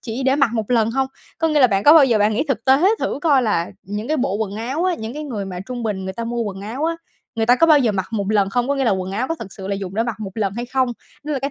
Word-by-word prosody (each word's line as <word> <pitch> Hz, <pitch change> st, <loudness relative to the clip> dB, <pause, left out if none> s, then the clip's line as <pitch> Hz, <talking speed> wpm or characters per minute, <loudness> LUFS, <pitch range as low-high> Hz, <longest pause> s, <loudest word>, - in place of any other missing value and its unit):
chỉ 235 Hz, +2 st, -5 dB
để 265 Hz, +1 st, +2 dB
mặc 275 Hz, -5 st, +3 dB
mộ 220 Hz, -, 0 dB
lần 230 Hz, -3 st, +2 dB
hông? 265 Hz, +2 st, 0 dB, 0.3 s
Có 325 Hz, -, +1 dB
nghĩa 305 Hz, -2 st, +2 dB
là 255 Hz, -, +8 dB
bạn 195 Hz, -4 st, 0 dB
có 295 Hz, -, +9 dB
bao 315 Hz, -3 st, +8 dB
giờ 235 Hz, -5 st, +2 dB
bạn 210 Hz, +1 st, +3 dB
nghĩ 235 Hz, -, 0 dB
thực 235 Hz, -5 st, -1 dB
tế 275 Hz, +8 st, +5 dB
thử -, -, -2 dB
coi 285 Hz, -5 st, +4 dB
là 190 Hz, -7 st, 0 dB
những 210 Hz, +4 st, -5 dB
cái 310 Hz, -, +1 dB
bộ 205 Hz, -7 st, 0 dB
quần 210 Hz, -2 st, -3 dB
áo 260 Hz, +10 st, -2 dB
á, 370 Hz, -1 st, +2 dB
những 220 Hz, -4 st, -6 dB
cái 300 Hz, +1 st, -5 dB
người 220 Hz, -8 st, -4 dB
mà 185 Hz, -2 st, -6 dB
trung 250 Hz, -1 st, -5 dB
bình 205 Hz, -4 st, -3 dB
người 190 Hz, -, -4 dB
ta 230 Hz, +4 st, -5 dB
mua 235 Hz, 0 st, -2 dB
quần 195 Hz, -3 st, -5 dB
áo 230 Hz, +9 st, -4 dB
á, 330 Hz, +1 st, 0 dB, 0.4 s
người 225 Hz, -1 st, 0 dB
ta 245 Hz, +2 st, +5 dB
có 330 Hz, -, +4 dB
bao 310 Hz, -2 st, +6 dB
giờ 240 Hz, -6 st, +2 dB
mặc 190 Hz, -2 st, -2 dB
một 210 Hz, -3 st, -2 dB
lần 200 Hz, -2 st, +2 dB
không? 245 Hz, +4 st, 0 dB
Có 280 Hz, -, +2 dB
nghĩa 275 Hz, -, 0 dB
là 230 Hz, -, +3 dB
quần 190 Hz, -1 st, -2 dB
áo 235 Hz, +6 st, -1 dB
nó 330 Hz, -, -1 dB
thực 195 Hz, -5 st, -8 dB
sự 190 Hz, -, -8 dB
là 200 Hz, -, 0 dB
dùng 195 Hz, -1 st, -6 dB
để 225 Hz, -, +1 dB
mặc 230 Hz, -2 st, -4 dB
một 200 Hz, -3 st, -5 dB
lần 205 Hz, -4 st, -1 dB
hay 240 Hz, +2 st, -4 dB
không? 260 Hz, 0 st, +1 dB, 0.4 s
Đó 300 Hz, -, -3 dB
là 280 Hz, -, 0 dB
cái 275 Hz, +2 st, -3 dB
230 Hz, 345 wpm, -20 LUFS, 205-270 Hz, 0.4 s, có